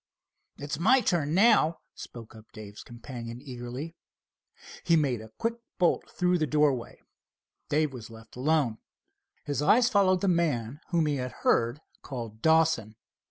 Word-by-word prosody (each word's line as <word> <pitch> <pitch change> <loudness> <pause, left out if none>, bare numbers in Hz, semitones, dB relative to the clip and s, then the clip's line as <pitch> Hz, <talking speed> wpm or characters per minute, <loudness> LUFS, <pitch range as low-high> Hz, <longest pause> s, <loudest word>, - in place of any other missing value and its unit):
"It's 145 +2 -5
my 255 +9 +5
turn 160 -7 0
now," 195 -6 +4 0.2
spoke 115 -1 -11
up 110 0 -16
Dave's 105 -2 -10
companion 120 0 -9
eagerly. 130 +4 -7 0.9
He 170 - +3
made 135 -8 +1
a 110 - -11
quick 230 +1 -2 0.2
bolt 175 -3 +1
through 180 -1 +1
the 155 - 0
doorway. 140 -4 0 0.7
Dave 150 -1 +1
was 120 -3 -9
left 115 -1 -14
alone. 135 -4 +1 0.7
His 145 -1 -2
eyes 240 +11 +4
followed 190 -4 +3
the 200 - 0
man 150 -7 0
whom 170 -2 +2
he 145 -2 0
had 125 -1 -4
heard 120 +6 +2 0.2
called 115 -5 -7
Dawson. 160 -9 +2
145 Hz, 145 wpm, -28 LUFS, 120-170 Hz, 0.9 s, my